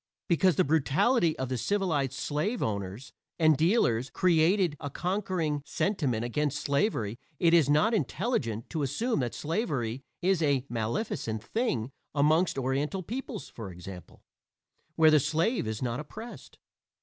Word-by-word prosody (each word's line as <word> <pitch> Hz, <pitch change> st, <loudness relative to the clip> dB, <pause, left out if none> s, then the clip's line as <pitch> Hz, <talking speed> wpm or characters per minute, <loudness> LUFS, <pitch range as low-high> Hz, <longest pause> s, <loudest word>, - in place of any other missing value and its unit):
Because 175 Hz, 0 st, +3 dB
the -, -, +4 dB
brutality 160 Hz, -, +2 dB
of 130 Hz, -1 st, -3 dB
the 130 Hz, -2 st, -2 dB
civilized 160 Hz, -, 0 dB
slave 155 Hz, -, -2 dB
owners 100 Hz, +4 st, -4 dB, 0.2 s
and 155 Hz, -2 st, +5 dB
dealers 135 Hz, -, +2 dB
created 175 Hz, 0 st, +3 dB
a 145 Hz, -, -4 dB
conquering 180 Hz, -3 st, -1 dB
sentiment 145 Hz, -, -1 dB
against 145 Hz, +4 st, -1 dB
slavery 140 Hz, -, 0 dB, 0.2 s
it 165 Hz, +2 st, +3 dB
is 160 Hz, -5 st, +5 dB
not 180 Hz, +11 st, +4 dB
intelligent 130 Hz, -, -1 dB
to 160 Hz, -, -2 dB
assume 180 Hz, -, 0 dB
that 120 Hz, -3 st, -2 dB
slavery 145 Hz, -, -2 dB, 0.2 s
is 185 Hz, -1 st, +2 dB
a 140 Hz, -4 st, +2 dB
maleficent 110 Hz, -, -2 dB
thing 135 Hz, -, -1 dB, 0.2 s
amongst 155 Hz, +3 st, +3 dB
Oriental 140 Hz, +8 st, -1 dB
peoples 235 Hz, +1 st, -6 dB
(for 110 Hz, -4 st, -8 dB
example) 90 Hz, 0 st, -11 dB, 0.7 s
where 160 Hz, -1 st, +6 dB
the 155 Hz, -, +6 dB
slave 165 Hz, -, 0 dB
is 110 Hz, +2 st, -3 dB
not 120 Hz, +1 st, -2 dB
oppressed. 220 Hz, +10 st, -9 dB
150 Hz, 135 wpm, -29 LUFS, 125-185 Hz, 0.7 s, where